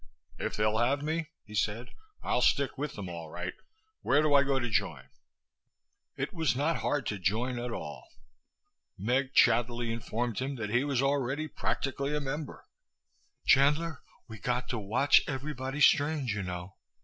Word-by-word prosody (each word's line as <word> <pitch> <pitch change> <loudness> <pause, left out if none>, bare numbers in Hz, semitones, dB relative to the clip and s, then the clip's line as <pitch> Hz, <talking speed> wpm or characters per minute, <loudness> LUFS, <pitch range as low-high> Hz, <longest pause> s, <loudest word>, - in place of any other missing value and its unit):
"If - - -2
they'll 105 +1 +2
have 135 +4 +1
me," 160 +1 -2 0.2
he 105 - -12
said, 110 +3 -1 0.3
"I'll 125 - +1
stick 140 +2 +2
with 150 +1 -4
them, 100 - -6
all 85 -2 -7
right! 90 +3 -5 0.5
Where 145 +3 +3
do 150 -1 +3
I 140 - +7
go 135 -1 +1
to 120 -2 -1
join?" 100 - -1 1.1
It - - -3
was 160 -7 +1
not 150 +5 +1
hard 145 -4 -1
to 105 -2 -3
join 115 +7 0
at 120 +1 -3
all. 75 -10 -6 0.9
Meg 130 +7 0
chattily 120 -1 +3
informed 115 0 -2
him 135 +2 -2
that 110 -4 -4
he 120 +3 +3
was 140 -2 0
already 140 +2 0
practically 140 -1 -2
a - - +1
member. 145 +1 -5 0.8
"Chandler, 150 +3 +3 0.3
we 110 -2 -9
got 125 +2 -1
to 120 - -2
watch 115 +8 +4
everybody 135 0 -4
strange, 145 -4 +4
you 105 - -2
know. 90 0 -6
125 Hz, 160 wpm, -30 LUFS, 110-140 Hz, 1.1 s, I